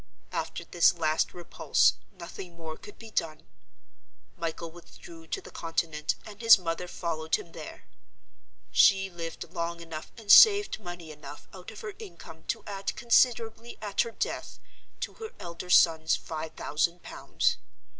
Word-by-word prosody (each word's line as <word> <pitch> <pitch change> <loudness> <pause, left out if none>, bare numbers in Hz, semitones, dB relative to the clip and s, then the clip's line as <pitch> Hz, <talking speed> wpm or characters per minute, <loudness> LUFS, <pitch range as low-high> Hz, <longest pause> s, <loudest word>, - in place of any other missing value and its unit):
After - - -4
this 175 0 +4
last 155 -2 +1
repulse, 175 -1 +2 0.2
nothing 175 -1 -10
more 160 -1 -6
could 415 - -13
be 225 -1 -12
done. 160 -5 -2 0.9
Michael 165 0 -4
withdrew 165 -1 -14
to - - -3
the - - -12
Continent; 160 -2 -2
and 210 0 -11
his 230 -1 +9
mother 175 -1 -3
followed 160 -2 -2
him 170 - -7
there. - - -9 0.9
She 195 -1 +5
lived 165 -1 -7
long 170 0 -3
enough, 165 -2 -8
and 215 -3 0
saved 410 - +8
money 175 -5 -8
enough 150 -1 -11
out 185 -1 -10
of 220 - -10
her 210 - -6
income, 160 -2 -11
to - - -3
add 195 -1 -4
considerably, 235 -1 +2
at 205 -2 0
her - - -2
death, 230 - -4 0.4
to - - -3
her 445 +2 -6
elder 170 +1 -7
son's 160 -2 +5
five 160 0 -6
thousand 170 +3 -1
pounds. - - -1
170 Hz, 150 wpm, -28 LUFS, 165-205 Hz, 0.9 s, his